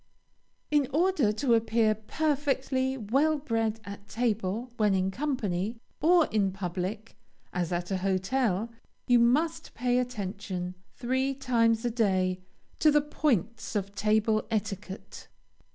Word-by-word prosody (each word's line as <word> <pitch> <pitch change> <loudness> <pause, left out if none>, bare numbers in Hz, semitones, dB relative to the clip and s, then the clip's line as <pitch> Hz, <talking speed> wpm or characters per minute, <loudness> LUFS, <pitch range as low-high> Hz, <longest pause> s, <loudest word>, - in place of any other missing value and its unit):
In 295 -3 +3
order 315 - +2
to 235 +3 +1
appear 225 -1 +3
perfectly 265 +2 -1
well 275 +8 +2
bred 225 -5 -1
at 200 0 -9
table 225 0 -1
when 210 -3 +3
in 190 0 +1
company, 225 -6 -2 0.2
or 335 +1 +5
in 200 -3 +2
public, 190 +3 -4 0.4
as 180 -1 -1
at 175 +1 -2
a 190 - +1
hotel, 195 +3 0 0.3
you 245 -1 +5
must 305 +7 +1
pay 245 +1 +1
attention, 195 -6 -4 0.2
three 260 +2 0
times 230 -3 +2
a 240 - +1
day, 190 -5 +1 0.4
to 310 - +5
the 295 0 +5
points 235 - -1
of 200 -1 -2
table 215 +1 +2
etiquette. 205 -3 -4
225 Hz, 125 wpm, -28 LUFS, 200-260 Hz, 0.4 s, or